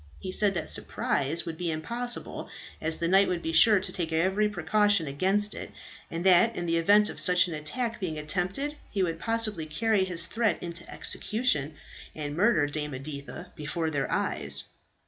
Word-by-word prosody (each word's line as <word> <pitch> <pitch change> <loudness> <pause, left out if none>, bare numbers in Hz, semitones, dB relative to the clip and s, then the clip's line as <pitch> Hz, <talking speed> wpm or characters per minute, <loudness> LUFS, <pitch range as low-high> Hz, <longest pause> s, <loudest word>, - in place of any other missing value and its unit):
He 185 - -6
said 200 0 +2
that - - -2
surprise 145 +4 0
would 165 -1 -6
be 175 -1 -2
impossible, 235 +10 -4 0.3
as 160 0 +2
the 170 - -1
knight 195 +3 +5
would 175 -2 -2
be 165 - -3
sure 205 +5 +7
to 190 - -4
take 170 -3 -3
every 190 +6 +1
precaution 205 0 +2
against 190 +9 +1
it; - - -7 0.4
and 170 +2 -5
that 190 +5 +6
in 175 - -3
the 165 0 +1
event 205 +5 +5
of - - -5
such 180 0 +4
an 170 - -5
attack 230 +11 -3
being 170 -6 -4
attempted, 185 - -2
he 195 -3 -1
would 165 -2 -2
possibly 215 -7 -1
carry 210 +5 +1
his 175 -2 +1
threat 225 +4 0
into 170 0 -7
execution, 160 - 0 0.4
and 145 -1 -5
murder 195 -3 +3
Dame 150 -1 -4
Editha 140 +5 -8
before 160 +1 -3
their 140 -3 -2
eyes. 70 -1 -1
175 Hz, 180 wpm, -27 LUFS, 155-205 Hz, 0.4 s, sure